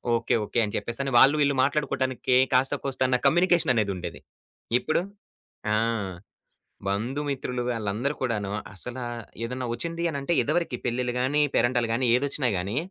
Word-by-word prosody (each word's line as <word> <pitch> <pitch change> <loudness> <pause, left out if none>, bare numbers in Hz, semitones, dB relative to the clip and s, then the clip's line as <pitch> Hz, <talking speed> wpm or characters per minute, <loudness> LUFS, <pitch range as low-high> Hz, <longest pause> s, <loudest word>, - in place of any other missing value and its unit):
Okay. 115 - +1
Okay." 120 - -1
అని 105 - -5
చెప్పేసని 135 +3 -3
వాళ్ళు 140 +3 +7
వీళ్ళు 140 -1 +2
మాట్లాడుకోవటానికి 130 -3 +1 0.2
కాస్త 135 +2 +3
కోస్త 135 -1 -4
అన్న 125 - +3
కమ్యూనికేషన్ 175 -6 +3
అనేదుండేది. 95 -6 -2 0.6
ఇప్పుడు, 155 - 0 0.7
ఆ! - - +3 1.1
బంధు 120 +9 -1
మిత్రులు 125 -3 -2
వాళ్ళందరూ 115 +4 -1
కూడాను 105 -6 -1 0.2
అసల 125 +6 -5 0.5
ఏదన్న 125 +2 -3
ఒచ్చింది 170 +7 -3
అనంటే 140 +2 -1
ఇదివరకి 160 -3 0
పెళ్లిలు 125 0 -1
గాని 145 +4 +2
పేరంటాలు 120 -1 +2
గాని 125 +2 +1
ఏదొచ్చినా 140 0 0
గాని 100 +8 -3
125 Hz, 135 wpm, -26 LUFS, 115-140 Hz, 1.1 s, వాళ్ళు